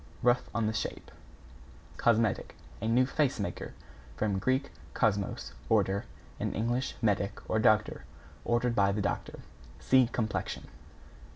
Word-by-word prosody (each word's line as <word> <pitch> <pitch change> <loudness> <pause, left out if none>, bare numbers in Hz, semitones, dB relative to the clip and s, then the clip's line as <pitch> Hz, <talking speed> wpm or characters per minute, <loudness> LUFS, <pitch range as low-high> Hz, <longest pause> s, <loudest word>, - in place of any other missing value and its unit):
Rough 125 +1 +3
on 115 -2 0
the 110 - 0
shape. - - -4 0.9
=COSMETIC= 115 -3 +2 0.3
A 110 - -1
new 120 +3 +4
face 135 -2 0
maker. 100 -4 -4 0.4
From 100 -3 0
Grk. 130 +6 0 0.2
kosmos, 105 -4 0 0.2
order, 100 -2 +2 0.3
and - - -2
Eng. 120 +3 +1 0.2
medic, 100 -2 +1
or 110 - +1
doctor, 110 0 +3 0.4
ordered 120 0 +1
by 100 -3 +3
the 105 +1 -1
doctor. 100 - -3 0.4
(See 130 -2 +4
Complexion.) 110 -3 -2
110 Hz, 125 wpm, -30 LUFS, 105-120 Hz, 0.9 s, new